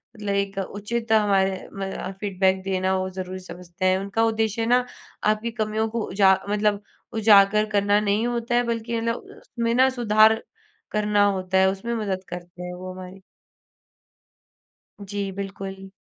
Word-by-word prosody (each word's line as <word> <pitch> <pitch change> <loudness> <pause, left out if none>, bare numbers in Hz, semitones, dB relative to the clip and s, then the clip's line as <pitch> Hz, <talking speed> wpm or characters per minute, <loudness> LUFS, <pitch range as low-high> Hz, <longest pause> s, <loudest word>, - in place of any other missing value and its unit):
मतलब 205 -2 -3
एक 200 0 -1
उचित 220 +4 -4
हमारे 195 -3 +2
मदा 195 -1 -5
फीडबैक 190 -1 +1
देना 190 0 0
वो 185 0 -2
ज़रूरी 185 0 -6
समझते 180 0 -7
हैं, 185 0 +4
उनका 200 +3 -1
उद्देश्य 225 0 0
ना 245 +2 +3 0.5
आपकी 215 +2 -2
कमियों 220 -1 -1
को 230 +1 -2
उजा 190 0 +4
मतलब 210 0 +1 0.3
उजागर 210 -1 +5
करना 205 0 +3
नहीं 210 +2 +1
होता 240 0 -1
है 245 - +3
बल्कि 230 0 -2
मतलब 230 0 0 0.2
उसमें 230 0 -3
ना 260 +1 +5
सुधार 220 -3 +4 0.5
करना 210 -1 +2
होता 190 -2 0
है 190 0 +5
उसमें 195 +5 -4
मदद 195 -4 -2
करते 175 0 -8
हैं 180 - -6
वो 185 +1 -7
हमारी। 185 +1 -10 1.8
जी, 200 0 -4
बिल्कुल। 195 0 -6
200 Hz, 150 wpm, -24 LUFS, 190-220 Hz, 1.8 s, उजागर